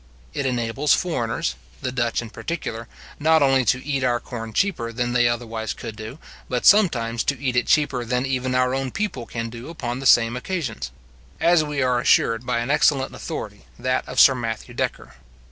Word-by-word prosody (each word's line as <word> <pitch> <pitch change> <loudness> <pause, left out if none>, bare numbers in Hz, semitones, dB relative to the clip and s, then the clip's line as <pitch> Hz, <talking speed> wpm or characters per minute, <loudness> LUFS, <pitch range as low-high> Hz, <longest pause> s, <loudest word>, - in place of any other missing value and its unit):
It 140 - -1
enables 125 +3 +1
foreigners, 115 - -1 0.3
the 130 - -1
Dutch 120 -2 -1
in 115 - -10
particular, 115 -9 -5 0.3
not 160 0 +4
only 135 -1 +4
to 125 +4 +1
eat 140 -3 -1
our 120 -1 +2
corn 115 -2 -7
cheaper 115 - 0
than 120 +1 -2
they 120 -1 +4
otherwise 115 -2 -3
could 115 -3 -7
do, 110 +5 -8 0.3
but 125 -1 -1
sometimes 120 - +4
to 140 -3 0
eat 130 -2 -1
it 125 - +1
cheaper 145 -5 +2
than 125 +2 -1
even 130 -1 -1
our 125 0 +2
own 135 0 -1
people 165 - -3
can 115 -1 -4
do 120 +5 -9
upon 125 -7 -4
the 135 - 0
same 115 -1 +5
occasions; 140 - -4 0.5
as 170 -2 +4
we 145 -2 -1
are 125 -1 +2
assured 115 0 +2
by 120 -1 +1
an 125 +4 -2
excellent 140 -2 +2
authority, - - -6 0.2
that 130 +1 0
of - - -1
Sir 135 - +8
Matthew 115 -3 -5
Decker. - - -3
125 Hz, 190 wpm, -23 LUFS, 115-135 Hz, 0.5 s, Sir